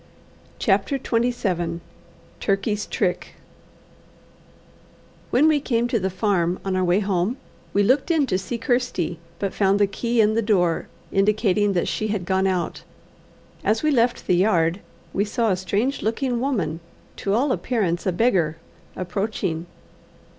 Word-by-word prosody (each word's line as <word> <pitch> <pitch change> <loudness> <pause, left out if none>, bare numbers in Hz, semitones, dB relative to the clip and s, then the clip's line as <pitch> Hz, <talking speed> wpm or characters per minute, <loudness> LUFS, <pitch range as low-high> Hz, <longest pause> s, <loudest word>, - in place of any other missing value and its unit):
CHAPTER 200 +5 +1
XXVII 225 -10 -1 0.6
Turkey's 200 +1 0
Trick 180 -3 -2 1.9
When 280 +6 +4
we 305 -2 +4
came 235 -3 +1
to 235 - +1
the 190 0 -1
farm 185 -3 0
on 190 -1 0
our 185 - +1
way 180 +3 +3
home, 195 +4 0 0.3
we 205 - +3
looked 260 - +2
in 320 -4 +3
to 190 -7 0
see 235 +5 -4
Kirsty, 235 - -1 0.2
but 200 -2 -2
found 200 0 +2
the 205 - +5
key 235 +4 -1
in 215 0 +4
the 230 - +2
door, 180 -6 +1 0.2
indicating 205 0 +2
that 175 - 0
she 215 - -1
had 205 -4 -2
gone 190 +1 +1
out. 185 -2 -1 0.8
As 220 +5 +1
we 305 - +3
left 245 -3 +2
the 180 - +3
yard, 175 -2 +2 0.3
we 200 - +2
saw 225 +1 0
a - - +3
strange 205 +9 -1
looking 240 +2 -1
woman, 205 - -1 0.4
to 200 0 0
all 265 +4 +2
appearance 195 -10 -1
a - - +3
beggar, 175 -6 +1 0.4
approaching. 185 -2 -3
205 Hz, 145 wpm, -23 LUFS, 185-235 Hz, 1.9 s, the